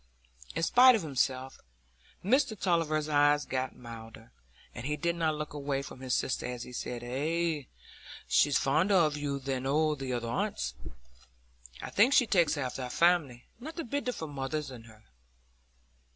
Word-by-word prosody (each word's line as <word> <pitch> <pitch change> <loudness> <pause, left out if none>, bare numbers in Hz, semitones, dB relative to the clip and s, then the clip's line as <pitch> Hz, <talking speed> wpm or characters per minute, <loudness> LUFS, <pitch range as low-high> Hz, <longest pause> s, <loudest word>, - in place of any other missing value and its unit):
In 165 - -1
spite 250 +7 +7
of 215 - -2
himself, 130 -2 -1 0.7
Mr 255 0 +2
Tulliver's 155 -4 +1
eyes 145 0 +3
got 130 0 -3
milder, 115 -1 -11 0.4
and 125 +2 -6
he 150 0 -1
did 170 +1 0
not 160 -2 0
look 150 -1 -5
away 140 -1 -2
from 130 - -10
his 130 -1 -1
sister 130 - -1
as 125 -1 -5
he 125 - -11
said,— 120 0 -5
"Ay; 150 +3 -1 0.6
she's 145 -1 +4
fonder 165 +9 +2
o' 170 -4 +5
you 145 -1 -3
than 135 -1 -3
o' 155 +2 +2
the 135 -3 -5
other 120 -1 -2
aunts, 65 - -2 1.1
I - - -6
think. 235 +7 +4
She 255 - +6
takes 175 -7 +2
after 130 -1 -3
our 125 - -4
family: 155 -6 +2
not 310 +7 -8
a - - -2
bit 285 +3 -3
of 250 - -2
her 160 - -3
mother's 140 0 -4
in 120 -3 -10
her." 110 -1 -17
145 Hz, 170 wpm, -30 LUFS, 130-170 Hz, 1.1 s, spite